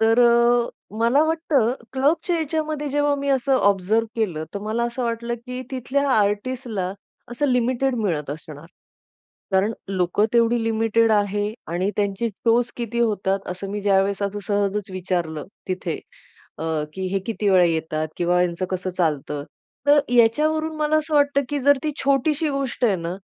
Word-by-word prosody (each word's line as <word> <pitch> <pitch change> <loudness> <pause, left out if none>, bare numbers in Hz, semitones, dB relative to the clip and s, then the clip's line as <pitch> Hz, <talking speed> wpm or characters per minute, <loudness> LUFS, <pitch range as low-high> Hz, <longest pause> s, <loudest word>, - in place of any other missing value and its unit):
तर 225 +1 +4
अ, 235 0 +4 0.3
मला 240 +6 +4
वाटतं 315 -7 +1 0.2
क्लबच्या 300 +6 +1
याच्यामध्ये 310 -1 -2
जेव्हा 290 +1 +1
मी 280 0 -3
असं 270 0 +2
ऑब्झर्व्ह 205 +1 +2
केलं, 180 -9 -1
तर 200 - -2
मला 220 +3 -1
असं 240 +2 -3
वाटलं 235 0 -2
की 250 0 -5
तिथल्या 275 +2 -1
आर्टिस्टला, 210 -2 0 0.4
असं 285 +5 0
लिमिटेड 250 +1 +1
मिळत 165 -10 -1
असणार. 155 0 -9 0.9
कारण 195 +4 +2 0.2
लोकं 190 +2 +1
तेवढी 235 0 +3
लिमिटेड 225 0 +2
आहे 205 0 +1 0.2
आणि 180 +4 0
त्यांचे 205 +2 0
शोज 235 +4 +1
किती 235 0 -3
होतात, 200 -4 +1
असं 185 +2 -5
मी 205 +1 -3
ज्यावेळेस 195 0 +2
असं 200 +1 -2
सहजच 205 -1 0
विचारलं 175 -4 -2 0.2
तिथे, 185 0 -2 0.6
अ, - - -5 0.3
की 190 0 -3
"हे 195 - +2
किती 215 -2 -1
वेळा 185 -2 +6
येतात?" 160 -2 -1
किंवा 175 0 +2
"यांचं 180 +1 -1
कसं 185 0 -2
चालतं?" 150 -5 -1 0.5
तर 290 0 +7 0.2
याच्यावरून 310 +7 +3
मला 305 0 +2
असं 310 0 -3
वाटतं 285 -1 +3
की 290 - -1
जर 285 +2 +5
ती 305 - +1
छोटीशी 285 +3 +2
गोष्ट 275 -3 -2
आहे 200 -5 +3
ना, 170 +1 -4
225 Hz, 155 wpm, -23 LUFS, 190-265 Hz, 0.9 s, तर